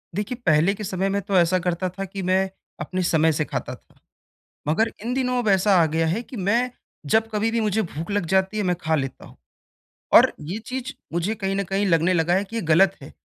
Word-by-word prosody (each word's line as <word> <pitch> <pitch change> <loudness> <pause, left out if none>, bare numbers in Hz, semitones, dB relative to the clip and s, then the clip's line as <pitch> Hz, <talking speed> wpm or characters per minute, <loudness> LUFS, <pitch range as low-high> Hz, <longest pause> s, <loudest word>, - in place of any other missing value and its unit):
देखिए, 210 +5 -2
पहले 160 +4 +4
के 210 - -7
समय 190 0 -1
में 200 +1 0
तो 195 0 0
ऐसा 180 +1 +3
करता 180 +1 -1
था 195 +2 -6
कि 195 +1 -6
मैं 190 +1 +1 0.3
अपने 185 0 -3
समय 160 -1 +3
से 150 0 -1
खाता - - -4
था। - - -27 0.7
मगर, 220 +9 +2
इन 240 - -2
दिनों 250 -1 0
अब - - -3
ऐसा 195 +1 +4
आ - - +4
गया 160 +1 0
है 195 +9 0
कि 250 - -11
मैं 235 +6 +1 0.4
जब 220 0 +3
कभी-भी 225 +2 0
मुझे 215 0 +1
भूख़ 165 +1 -6
लग 205 -3 0
जाती 190 +4 +1
है 210 - 0
मैं 180 -2 +1
खा 160 0 +1
लेता 135 -2 -4
हूँ। - - -16 0.8
और - - +7
ये 170 +8 -5
चीज़ 260 +2 -4 0.2
मुझे 175 +6 -1
कहीं 195 -2 -2
न 200 - 0
कहीं 195 +2 -1
लगने 170 0 +3
लगा 175 +1 +2
है 195 - +1
कि 225 +3 -8
ये 225 - -1
ग़लत 195 +4 +4
है। 135 - -11
190 Hz, 230 wpm, -23 LUFS, 170-210 Hz, 0.8 s, और